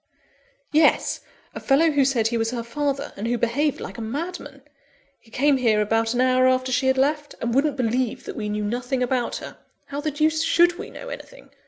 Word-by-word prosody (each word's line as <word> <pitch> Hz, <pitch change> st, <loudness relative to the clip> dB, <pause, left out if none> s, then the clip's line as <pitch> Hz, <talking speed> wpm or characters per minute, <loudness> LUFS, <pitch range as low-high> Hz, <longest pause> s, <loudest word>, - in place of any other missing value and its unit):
"Yes; 310 Hz, 0 st, +3 dB, 0.3 s
a -, -, -6 dB
fellow 315 Hz, +4 st, +3 dB
who 285 Hz, -2 st, +3 dB
said 235 Hz, -5 st, +2 dB
he 235 Hz, -, -1 dB
was 225 Hz, 0 st, 0 dB
her 235 Hz, -1 st, -3 dB
father, 280 Hz, +3 st, -3 dB
and 210 Hz, +3 st, -4 dB
who 240 Hz, +1 st, 0 dB
behaved 265 Hz, +6 st, 0 dB
like -, -, -7 dB
a -, -, -4 dB
madman. 285 Hz, +3 st, -5 dB, 0.6 s
He 230 Hz, -, -23 dB
came 275 Hz, +4 st, +2 dB
here 225 Hz, -4 st, +2 dB
about 225 Hz, +2 st, +1 dB
an 245 Hz, -, +2 dB
hour 255 Hz, 0 st, +4 dB
after 255 Hz, 0 st, +1 dB
she 255 Hz, +1 st, +1 dB
had 265 Hz, 0 st, +3 dB
left, 295 Hz, +2 st, 0 dB
and 235 Hz, 0 st, -2 dB
wouldn't 280 Hz, +2 st, +1 dB
believe 250 Hz, 0 st, -1 dB
that -, -, -6 dB
we 210 Hz, -1 st, -4 dB
knew 210 Hz, 0 st, -2 dB
nothing 250 Hz, +4 st, -1 dB
about 250 Hz, -1 st, -1 dB
her -, -, -8 dB, 0.3 s
(how 285 Hz, +1 st, -5 dB
the 305 Hz, -, -1 dB
deuce 310 Hz, +2 st, +1 dB
should 345 Hz, +2 st, +3 dB
we 435 Hz, -, -6 dB
know -, -, -9 dB
anything!) -, -, -10 dB
260 Hz, 210 wpm, -23 LUFS, 235-295 Hz, 0.6 s, hour